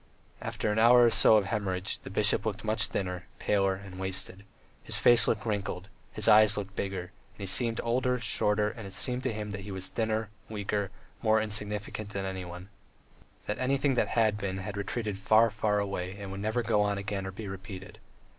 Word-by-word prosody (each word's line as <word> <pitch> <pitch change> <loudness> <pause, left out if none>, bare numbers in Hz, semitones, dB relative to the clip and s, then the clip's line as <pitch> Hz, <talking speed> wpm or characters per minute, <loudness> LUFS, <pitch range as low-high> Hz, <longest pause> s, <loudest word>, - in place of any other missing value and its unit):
After 105 - -2
an 105 - 0
hour 120 +2 +7
or 120 - +5
so 110 - +6
of 105 - +1
hemorrhage 95 -2 -2
the - - -10
bishop 105 +1 +2
looked 110 0 -3
much 110 0 0
thinner, 90 -1 -4
paler, 95 -2 +1
and 95 -1 -10
wasted; 95 +1 -3 0.4
his - - 0
face 120 -1 +7
looked 110 0 0
wrinkled, 100 -3 -3 0.2
his - - +1
eyes 105 -1 +6
looked 100 -1 -5
bigger, 95 -2 -4 0.2
and - - -27
he - - -3
seemed 115 +4 +3
older, 125 +2 +1
shorter, 105 -2 0
and 110 -5 -9
it 95 - -6
seemed 125 +5 0
to 130 -1 -1
him 105 -1 -5
that 100 -1 -5
he 100 - -9
was 95 -1 -4
thinner, 110 -1 -1 0.2
weaker, 105 -2 -2 0.3
more 110 0 +3
insignificant 105 -1 -3
than 100 -2 -4
any 95 -1 -4
one, 90 +2 -9 0.8
that 105 - -3
everything 135 +2 +1
that 125 - +1
had 110 -2 +3
been 95 -2 -3
had 95 +1 -5
retreated 100 0 -3
far, 110 +3 +4
far 105 0 0
away 95 -2 -3
and 100 -1 -7
would 95 +1 -6
never 110 +3 -1
go 110 -2 +2
on 100 -1 0
again 100 -1 -4
or - - -5
be 105 +2 -8
repeated. 95 0 -9
105 Hz, 200 wpm, -29 LUFS, 95-110 Hz, 0.8 s, hour